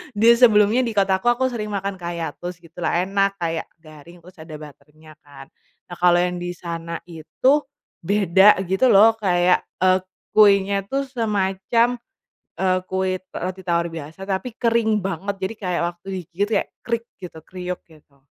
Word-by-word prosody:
dia 225 +3 +6
sebelumnya 215 -1 +5
di 235 -4 -1
kotaku 195 +1 +1
aku 255 +2 +2
sering 215 -3 -4
makan 200 -2 -4
kayak 170 -1 -5
toast 175 +1 -6
gitulah 170 +1 -2
enak 195 +1 0
kayak 165 -3 -3 0.2
garing 160 +3 -15
terus 180 -1 -17
ada 160 -1 -9
butter-nya 155 +1 -14
kan, 135 -1 -15 0.4
nah 175 - -7
kalo 175 0 +5
yang 180 0 -2
disana 170 -1 -6
itu, 180 - 0 0.4
beda 195 +2 +4
gitu 190 +7 +2
loh 220 +1 +7
kayak, 180 -3 +3 0.2
eee, 185 0 +4 0.3
kuenya 200 -1 +4
tuh 275 +3 -1
semacam, 230 -1 0 0.6
eee, 185 -1 +2
kue 190 0 -1 0.2
roti 185 +2 -5
tawar 170 -1 0
biasa 165 +4 -9
tapi 200 +6 -2
kering 230 -2 +2
banget 195 +1 -3
jadi 190 +3 -3
kayak 180 -4 -2
waktu 175 +1 -12
digigit 180 +4 -3
kayak - - -8 0.2
krik 235 -1 -2
gitu 175 -4 -10
kriuk 180 +2 -6
gitu. 150 -3 -22
190 Hz, 155 wpm, -22 LUFS, 170-210 Hz, 0.6 s, loh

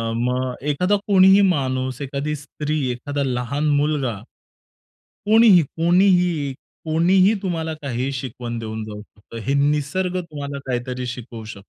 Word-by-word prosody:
मग 125 +2 -1 0.2
एखादा 180 +8 +2
कोणीही 195 0 +6
माणूस, 130 -7 0
एखादी 140 +2 -3
स्त्री, 150 +1 -4
एखादा 140 +4 -3
लहान 130 +3 -1
मुलगा, 145 -7 0 1.1
कोणीही, 215 -4 +6
कोणीही, 175 -2 +2 0.3
कोणीही 185 +6 +4
तुम्हाला 165 -3 -2
काहीही 130 0 -2
शिकवण 125 -2 -5
देऊन 110 -1 -5
जाऊ 105 -1 -8
शकतं. 105 +2 -14
हे 135 - 0
निसर्ग 150 +6 0
तुम्हाला 145 -4 -6
काहीतरी 125 0 -3
शिकवू 120 -2 -7
शकतो. 100 -2 -10
140 Hz, 120 wpm, -21 LUFS, 125-170 Hz, 1.1 s, कोणीही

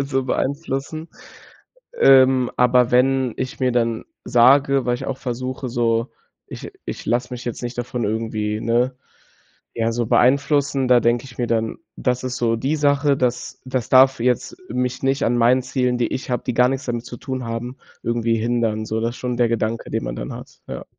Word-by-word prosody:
so 135 -1 -1
beeinflussen. 145 +3 -3 0.9
Ähm, 130 - +5
aber 125 0 +4
wenn 130 0 +2
ich 130 0 -4
mir 130 -1 +2
dann 115 -2 0 0.2
sage, 135 +2 +4
weil 120 - +2
ich 120 - -6
auch 135 -1 -3
versuche, 130 +1 -4
so: 115 0 0 0.4
„Ich - - -8 0.2
ich - - -6
lasse 125 +2 0
mich 125 0 -6
jetzt 120 0 -5
nicht 120 0 -5
davon 120 -1 -3
irgendwie, 110 0 -2
ne, 120 +3 +1 0.8
ja 115 0 0
so 120 0 -1
beeinflussen.“ 140 +1 +2
Da 125 -1 +6
denke 120 +1 +2
ich 125 -2 -13
mir 120 - -1
dann: 115 -1 -1 0.2
„Das 125 0 -1
ist 130 -1 -3
so 115 -1 +1
die 135 +7 -1
Sache, 145 -1 +2
das 125 -1 -2
das 130 -2 -2
darf 130 0 +6
jetzt 125 - 0
mich 125 +1 -2
nicht 135 +1 +1
an 120 +1 +1
meinen 125 +2 +4
Zielen, 125 -1 -1
die 120 - +1
ich 130 - -5
habe, 125 - -1
die 125 - -1
gar 125 +1 +4
nix 135 +1 -3
damit 120 -1 -3
zu - - -8
tun 130 0 -5
haben, 115 +2 -5 0.3
irgendwie 115 -1 0
hindern“, 115 -1 -1
so 110 +1 -2
das 115 +1 0
ist - - -11
schon 125 -1 -3
der 120 - +3
Gedanke, 115 0 -2
den - - -1
man - - -4
dann - - -6
hat. - - -11
Ja. - - -7
125 Hz, 195 wpm, -21 LUFS, 115-130 Hz, 0.9 s, Da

